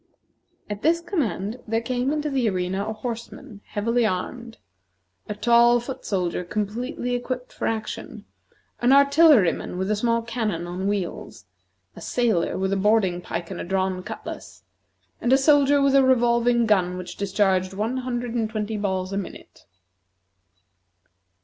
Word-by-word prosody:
At 205 0 -5
this 330 +3 +3
command 250 - -2
there 225 +1 +1
came 250 +3 -1
into 300 -1 -2
the 255 -5 +1
arena 190 +1 -2
a - - -2
horseman 230 0 -7
heavily 230 +3 0
armed, 230 +4 -3 0.7
a 210 - -3
tall 235 +2 +5
foot 255 +3 -7
soldier 180 -3 -1
completely 220 +6 -3
equipped 250 +1 -4
for - - -3
action, 220 -1 -5 0.5
an 245 +2 +4
artilleryman 280 - +4
with 190 +3 -1
a - - +2
small 230 +2 0
cannon 225 -7 -2
on 180 +2 -4
wheels, 195 - -4 0.5
a - - -11
sailor 225 -9 0
with 190 +1 0
a - - +1
boarding 195 -3 +2
pike 175 0 -5
and 185 - -5
a - - -4
drawn 190 0 -1
cutlass, - - -8 0.6
and 245 - 0
a 265 - +7
soldier 285 0 +4
with 275 -1 +3
a 275 -1 +6
revolving 240 -2 +3
gun 185 -4 +2
which 180 -1 -7
discharged 190 -2 +1
one 225 +6 -1
hundred 245 -2 -3
and 225 -3 -1
twenty 215 0 -3
balls 190 -2 -2
a - - -1
minute. 200 - -8
225 Hz, 150 wpm, -24 LUFS, 190-245 Hz, 0.7 s, a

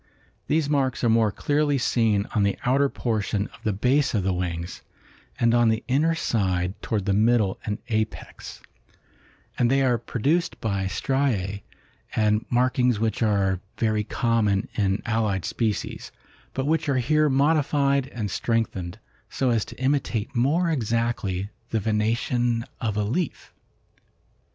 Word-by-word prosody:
These 155 -1 +1
marks 135 -4 0
are 120 - +4
more 110 -2 +3
clearly 145 +4 +1
seen 110 -5 +1
on 105 - +2
the 100 0 +1
outer 135 +3 +3
portion 105 -5 -1
of - - -15
the 110 - +1
base 125 +7 +1
of 100 - +1
the 95 0 +1
wings 85 -1 -4 0.6
and 115 0 +3
on 120 -1 +4
the 110 0 0
inner 155 +6 +2
side 95 - 0
toward 105 -4 -2
the 100 - +1
middle 110 -1 +2
and 105 -1 -1
apex, 110 -1 -4 1.0
and 120 - +3
they 135 +1 +3
are 125 -3 +2
produced 145 +9 -1
by 100 -3 -1
striae 100 -5 -1 0.5
and 105 0 +1
markings 125 -2 +2
which 110 +1 -1
are 100 -4 +2 0.2
very 110 -2 +1
common 110 -3 0
in 100 -1 0
allied 110 -5 0
species, 110 -3 -2 0.4
but 135 - -1
which 155 0 +1
are 135 - +2
here 150 +4 +2
modified 140 -1 +2
and 110 -7 -4
strengthened 100 -4 -1 0.3
so 130 -2 0
as 115 -3 +2
to - - -12
imitate 130 -4 -1
more 160 +8 +2
exactly 115 - -1 0.2
the 115 - 0
venation 115 +2 0 0.2
of 110 -4 -2
a 105 - +1
leaf. 140 - -3
115 Hz, 145 wpm, -25 LUFS, 105-135 Hz, 1.0 s, are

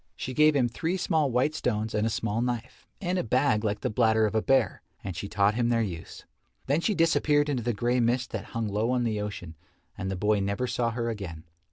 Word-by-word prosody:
She 130 - -5
gave 150 +2 +5
him 130 -3 +3
three 165 +10 -2
small 160 -5 +1
white 125 +5 +1
stones 110 -7 -1
and 105 +1 +1
a - - +1
small 115 0 -1
knife, 120 0 -4
and 180 -1 -1
a - - 0
bag 125 -1 +2
like 105 -1 -1
the - - -1
bladder 110 -1 +3
of 105 - -1
a 110 - +2
bear, 130 -6 +2 0.2
and 95 -3 -5
she 100 - -5
taught 100 0 +2
him 120 +1 +1
their 115 -1 +2
use. 85 -6 -7 0.4
Then 145 +5 +1
she 210 +3 +1
disappeared 150 -3 +3
into 130 -4 0
the 120 +1 0
grey 120 +3 0
mist 120 +1 +1
that 110 -2 -4
hung 115 -1 -3
low 105 +3 0
on 125 -1 +1
the 110 -3 -1
ocean 100 -5 -6 0.4
and 95 - -4
the 95 - -2
boy 105 +2 +1
never 100 +5 -1
saw 120 -1 0
her 115 0 -2
again. 90 -8 -7
115 Hz, 235 wpm, -27 LUFS, 105-130 Hz, 0.4 s, gave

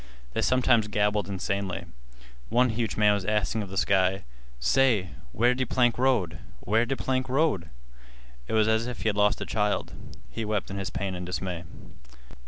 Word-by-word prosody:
They - - 0
sometimes 125 -4 +3
gabbled 105 -1 0
insanely. 100 -1 -3 0.6
One 125 +2 +3
huge 115 0 -2
man 105 -1 +5
was 100 -2 -1
asking 105 +2 0
of 100 - -6
the 95 - -6
sky: 95 -1 +2 0.4
"Say, 110 - +3 0.2
where 120 - +3
de 130 +1 -1
plank 120 -1 +2
road? 125 -10 +1 0.2
Where 110 +4 +1
de 135 +1 -1
plank 130 0 -1
road!" 130 - +1 0.8
It - - -4
was 110 -1 +4
as 110 +1 +1
if 125 - -6
he 110 - +2
had 105 - -1
lost 105 0 +2
a - - -2
child. 105 -1 -1 0.4
He 115 - -4
wept 105 -3 -2
in 100 - -4
his 95 - -3
pain 100 -1 -3
and 90 0 -5
dismay. 90 -1 -4
105 Hz, 180 wpm, -27 LUFS, 95-120 Hz, 0.8 s, man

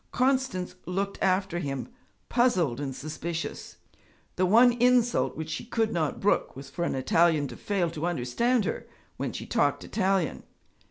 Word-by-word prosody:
Constance 255 -8 0
looked 195 +2 -2
after 185 -2 +1
him, 140 -4 -4 0.4
puzzled 180 - +2
and 135 -2 -4
suspicious. 160 +3 -5 0.6
The 185 0 +2
one 235 +6 +7
insult 245 -1 +3
which 160 0 -5
she - - -4
could 225 -1 -1
not 160 -4 -1
brook 205 - +1
was 135 +1 -10
for 170 - -3
an - - -1
Italian 155 +2 +3
to - - -8
fail 185 -5 -1
to 165 +1 -3
understand 195 - +1
her - - -3 0.3
when - - -2
she - - -6
talked - - +1
Italian. 190 -4 0
180 Hz, 155 wpm, -27 LUFS, 155-225 Hz, 0.6 s, one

